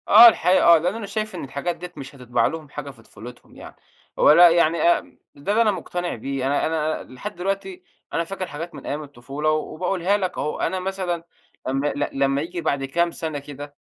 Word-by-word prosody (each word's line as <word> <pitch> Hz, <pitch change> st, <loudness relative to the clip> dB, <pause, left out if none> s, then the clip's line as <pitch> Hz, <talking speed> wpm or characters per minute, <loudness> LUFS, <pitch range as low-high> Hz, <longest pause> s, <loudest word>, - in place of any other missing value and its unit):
آه 240 Hz, -, +10 dB
الحقيقة 190 Hz, -5 st, +4 dB
آه، -, -, +6 dB
لأن 175 Hz, +5 st, -1 dB
أنا 225 Hz, -2 st, -5 dB
شايف 215 Hz, +2 st, -4 dB
إن -, -, -5 dB
الحاجات 140 Hz, +6 st, -3 dB
ديّة 180 Hz, 0 st, -9 dB
مش 135 Hz, 0 st, -9 dB
هتطبّع 125 Hz, -2 st, 0 dB
لهم 160 Hz, -2 st, -6 dB
حاجة 145 Hz, -1 st, -7 dB
في 120 Hz, -5 st, -13 dB
طفولتهم 115 Hz, +3 st, -13 dB
يعني، -, -, -11 dB, 0.4 s
هو -, -, +7 dB
لأ 175 Hz, +3 st, +9 dB
يعني 170 Hz, -1 st, +3 dB
أم 175 Hz, -, +1 dB, 0.2 s
ده 145 Hz, +8 st, -3 dB
اللي 220 Hz, +2 st, +3 dB
أنا 215 Hz, -, +3 dB
مقتنع 175 Hz, -1 st, -4 dB
بيه، 135 Hz, +3 st, -3 dB
أنا 140 Hz, +1 st, +1 dB
أنا 155 Hz, -1 st, -1 dB
لحد 205 Hz, +11 st, -7 dB
دلوقتي 190 Hz, 0 st, -4 dB, 0.3 s
أنا 165 Hz, -, +1 dB
فاكر 185 Hz, +2 st, -5 dB
حاجات 165 Hz, +3 st, -7 dB
من -, -, -10 dB
أيّام 150 Hz, +2 st, -3 dB
الطفولة، 140 Hz, +2 st, -3 dB
وباقولها 180 Hz, +5 st, 0 dB
لك 185 Hz, -3 st, -3 dB
أهو، 150 Hz, -, -2 dB
أنا 185 Hz, -, -1 dB
مثلًا 185 Hz, -2 st, -3 dB, 0.4 s
لمّا 135 Hz, +2 st, 0 dB
ل 145 Hz, 0 st, -1 dB
لمّا 135 Hz, 0 st, +2 dB
ييجي 170 Hz, +2 st, -5 dB
بعد 140 Hz, -4 st, -1 dB
كام 170 Hz, +5 st, 0 dB
سنة 160 Hz, -3 st, -4 dB
كده 145 Hz, 0 st, -10 dB
160 Hz, 205 wpm, -23 LUFS, 140-180 Hz, 0.4 s, آه